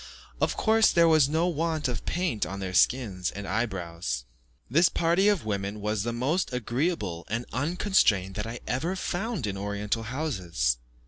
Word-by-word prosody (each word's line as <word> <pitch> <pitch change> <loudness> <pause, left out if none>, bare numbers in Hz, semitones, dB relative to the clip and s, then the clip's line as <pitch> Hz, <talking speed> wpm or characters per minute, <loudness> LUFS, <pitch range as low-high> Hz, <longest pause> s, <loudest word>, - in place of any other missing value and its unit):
Of - - +1
course, 220 0 +4
there 170 -1 +5
was 155 -4 +5
no 160 +3 +2
want 165 -3 0
of 125 - -4
paint 175 - 0
on 95 +5 -4
their 95 -1 -4
skins 95 -4 +2
and 100 0 -7
eye 115 +5 +1
brows. 85 - -4 0.4
This 165 +8 +4
party 170 +4 +2
of 205 - +2
women 100 0 -2
was 105 0 -1
the 120 +3 -2
most 135 +11 0
agreeable 125 - -2
and 115 +3 -2
unconstrained 140 - +2
that 105 +2 -4
I 115 +1 -6
ever 145 - -1
found 190 - -2
in 100 -2 -3
Oriental 105 +2 -2
houses. 95 - -1
120 Hz, 170 wpm, -27 LUFS, 100-165 Hz, 0.4 s, there